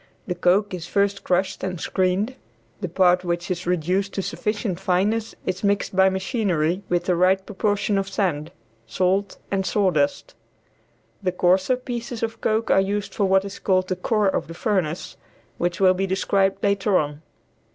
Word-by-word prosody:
The 185 - -2
coke 185 +3 +2
is 170 -3 -5
first 200 0 0
crushed 185 +1 0
and 185 -2 -3
screened, 190 +8 0 0.5
the 185 - -4
part 180 +1 +3
which 175 +1 -2
is 180 0 -3
reduced 180 +3 0
to 195 - -2
sufficient 205 -4 -2
fineness 200 +4 0
is 185 +1 -3
mixed 200 -1 0
by 190 0 +5
machinery 190 - 0
with 175 0 0
the 180 - +2
right 190 +2 +3
proportion 205 0 0
of 195 0 -3
sand, 175 -6 -1 0.4
salt 185 - 0
and 195 -1 +1
sawdust. 275 - 0 0.9
The 185 -2 0
coarser 185 +6 +2
pieces 240 -2 -5
of 225 0 -3
coke 220 +1 +1
are 195 - +5
used 200 +1 -2
for 205 - +1
what 190 0 +3
is 200 - -7
called 185 -1 +1
the 185 - 0
core 210 +3 +1
of - - -2
the 165 - -9
furnace, 175 -4 -2 0.4
which 175 +1 -1
will 185 -1 +5
be 190 +1 -1
described 195 +1 +1
later 200 -1 +2
on. 145 0 -2
190 Hz, 170 wpm, -23 LUFS, 180-205 Hz, 0.9 s, by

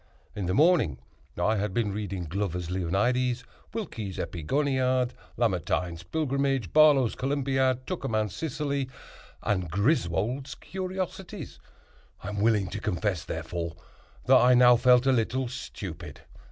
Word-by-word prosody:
In 100 -4 -3
the 90 - 0
morning 145 - +4 0.4
I 105 +6 +2
had 100 -1 -2
been 105 -4 0
reading 100 -3 -4
Glover's 90 0 -3
"Leonidas," 120 +8 0 0.3
Wilkie's 115 - -5
"Epigoniad," 130 - 0 0.3
Lamartine's 90 -5 0
"Pilgrimage," 135 - -1
Barlow's 145 -6 +6
"Columbiad," 135 -2 0
Tuckermann's 110 - -2
"Sicily," 145 -4 -2 0.5
and 95 -5 0
Griswold's 105 - 0
"Curiosities"; 185 -1 -5 0.6
I 100 - -4
am 105 -1 -3
willing 110 -3 +3
to - - -5
confess, 95 -3 -1
therefore, 85 -1 -4 0.5
that - - +7
I 125 0 +6
now 125 0 +7
felt 125 +1 +5
a 135 - +4
little 130 +2 0
stupid. 95 -8 -7
120 Hz, 120 wpm, -27 LUFS, 95-135 Hz, 0.6 s, that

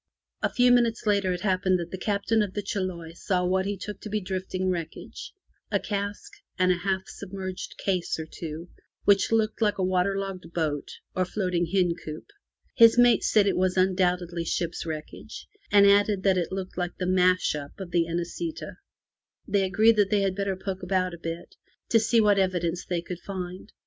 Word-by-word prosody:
A - - 0
few 245 0 +4
minutes 240 -2 +2
later 200 -3 +2
it 180 -1 -3
happened 185 -1 +2
that 170 0 -6
the 190 - -4
Captain 210 +2 +1
of 200 -3 -3
the 205 - -2
Chiloe 185 -5 -4
saw 180 +1 -1
what 190 +1 +1
he 200 0 -2
took 205 +2 -7
to 215 - -7
be 215 +1 0
drifting 185 -1 -3
wreckage 165 -3 -6 0.2
— - - -43
a - - +2
cask, 200 0 -4 0.3
and 185 0 +3
a 180 - +1
half 190 +1 -1
sub 200 -2 -10
merged 185 -2 -6
case 185 -3 -1
or 160 - -5
two, 160 +1 -7 0.4
which 200 +1 +4
looked 220 0 +1
like 210 -2 +2
a 190 - 0
water 185 +1 +1
logged 190 -3 -5
boat 150 -4 -1 0.3
or 185 - +2
floating 180 -2 -1
hen 180 0 +2
coop. 155 0 -7 0.5
His 230 -1 +7
mate 245 -1 +6
said 210 -2 +4
that 200 - +3
it - - -3
was 185 0 +1
undoubtedly 180 -2 +1
ship's 170 0 -2
wreckage, 155 -1 -7 0.3
and 200 -1 +7
added 200 -1 +4
that 195 -2 +4
it 175 -3 -1
looked 190 -1 -5
like 175 0 -3
the 185 - -2
smash 185 0 +3
up 145 +2 -7
of 185 -3 -7
the 170 -1 +2
Inesita'' 175 - -4 0.7
They 200 - +2
agreed 220 +4 +4
that 205 -2 +3
they 205 -1 +2
had 195 -1 +1
better 200 -1 -1
poke 190 0 -5
about 185 -1 0
a 170 - -9
bit 165 +1 -6 0.4
to 230 - +5
see 230 +1 +3
what 205 -2 +4
evidence 180 -2 -1
they 175 -2 -2
could 175 0 -6
find. 185 +1 -7
185 Hz, 200 wpm, -26 LUFS, 180-200 Hz, 0.7 s, His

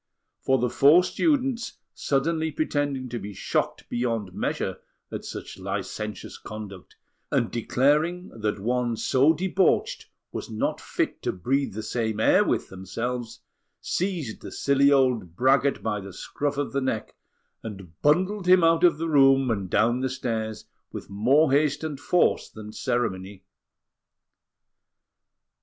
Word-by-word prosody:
For 130 - +2
the 125 -1 0
four 150 +8 +6
students, 265 - 0 0.2
suddenly 160 +3 0
pretending 145 -3 -1
to 120 0 -4
be 100 0 -8
shocked - - -2
beyond 115 -6 -2
measure - - -2 0.3
at - - -6
such - - -8
licentious 105 -3 -5
conduct 105 -4 -9 0.4
and - - +1
declaring 150 +9 +1
that 105 -2 -3
one 120 +2 -1
so 135 +7 +3
debauched 185 +3 +1 0.2
was - - -6
not 110 -1 -2
fit - - -2
to - - -1
breathe 135 +5 -1
the 110 - -4
same 110 -1 -2
air - - +5
with - - -1
themselves, 115 +6 -5 0.4
seized 170 - -3
the - - -8
silly 140 0 +3
old 125 - +2
braggart 135 +4 +2
by 105 -2 -1
the 100 -1 -9
scruff 145 +8 -3
of 145 -1 -2
the 140 - 0
neck, 130 -4 -2 0.5
and 95 -7 -10
bundled 185 +6 +2
him 180 -1 +6
out 165 +1 +4
of 175 -4 +5
the 165 +1 -2
room 135 -4 +5
and 100 -4 -2
down 120 +6 +2
the 130 0 -1
stairs 110 -4 -3 0.3
with - - -8
more 130 +9 +3
haste 150 +1 +2
and 150 -4 -4
force 175 +4 +2
than 105 -1 -10
ceremony. 95 -5 -2
130 Hz, 140 wpm, -25 LUFS, 110-150 Hz, 0.5 s, four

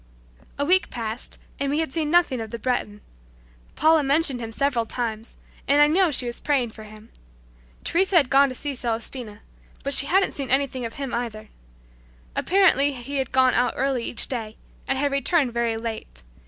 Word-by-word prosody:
A 285 - 0
week 370 +3 +4
passed, 230 0 -4 0.2
and 280 - -1
we 290 - 0
had 320 -4 -2
seen 315 -3 -1
nothing 330 -7 +2
of 220 - -6
the 235 - -5
Breton. 220 -3 -2 0.7
Paula 315 0 +4
mentioned 280 -1 +2
him 225 -1 -6
several 245 -2 0
times, 225 -2 -4 0.3
and 285 +1 +4
I 295 - +8
know 345 +4 +3
she 260 -3 0
was 240 0 -4
praying 265 -6 0
for 215 0 -12
him. 215 +1 -14 0.7
Teresa 380 +2 +1
had 280 -6 +3
gone 275 0 +5
to 255 - -5
see 285 +2 -4
Celestina, 230 -2 -3 0.4
but 280 - -1
she 280 - +5
hadn't 380 +5 +2
seen 275 -3 -3
anything 265 -2 0
of 225 - -7
him 275 -2 -5
either. 220 -3 -4 0.9
Apparently 325 -7 +3
he 270 +2 -6
had 265 - -2
gone 260 -1 +4
out 245 - +1
early 265 -2 0
each 230 - 0
day, 225 -4 -5 0.3
and 270 - 0
had 285 +1 0
returned 275 -2 +1
very 235 -1 0
late. 220 - -7
260 Hz, 185 wpm, -24 LUFS, 230-285 Hz, 0.9 s, I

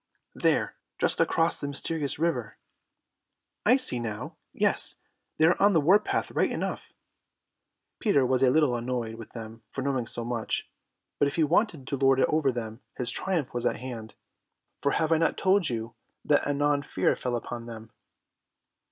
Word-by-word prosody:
"There, - - +1 0.2
just - - +1
across 165 +1 +2
the 145 - -2
Mysterious 145 +1 -1
River." 145 -9 -1 1.1
"I 250 +4 +7
see 190 - 0
now. 110 -3 -5 0.2
Yes, - - +1 0.4
they 155 - +4
are 170 +2 +3
on 200 +1 +5
the 165 - +5
war 180 +8 +5
path 210 - -2
right - - +1
enough." - - -4 1.1
Peter 145 - +3
was 130 0 +1
a 130 - +5
little 145 -2 +3
annoyed 120 -1 -3
with 115 -1 -11
them 115 -1 -8
for 135 - -5
knowing 130 -4 -1
so 120 -1 -3
much, 120 -2 -2 0.5
but 145 - +4
if 140 - -3
he 165 - +3
wanted 160 - +1
to 140 - -3
lord 135 0 +4
it - - +4
over 150 -3 +2
them 115 -1 -6 0.2
his 125 -1 0
triumph 175 -5 -1
was 120 -1 -2
at - - 0
hand, 115 -4 -8 0.7
for 140 - +1
have 160 0 0
I 160 - +4
not 165 - +1
told 190 -3 +3
you 115 -1 -4 0.3
that 145 - +3
anon 145 0 +1
fear - - 0
fell 125 -1 -2
upon 120 0 -5
them? 115 -1 -9
135 Hz, 175 wpm, -27 LUFS, 120-160 Hz, 1.1 s, I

